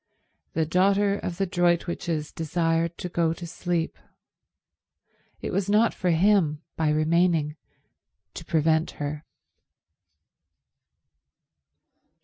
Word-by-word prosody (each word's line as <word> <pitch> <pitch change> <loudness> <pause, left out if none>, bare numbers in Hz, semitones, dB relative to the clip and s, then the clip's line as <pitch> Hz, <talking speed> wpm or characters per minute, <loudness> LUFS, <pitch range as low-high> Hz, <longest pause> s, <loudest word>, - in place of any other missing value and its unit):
The 160 0 +1
daughter 200 +4 +2
of 170 - -5
the 195 - +1
Droitwiches 170 -3 0
desired 165 +1 0
to - - -4
go 170 -2 +1
to 170 - -8
sleep. 170 0 -3 1.4
It - - -3
was 195 0 0
not 215 +3 +4
for 180 - -1
him, 170 -3 +3
by 160 -1 +1
remaining, 155 0 +2 0.8
to - - -7
prevent 160 0 +2
her. 150 +1 -4
170 Hz, 100 wpm, -26 LUFS, 160-180 Hz, 1.4 s, not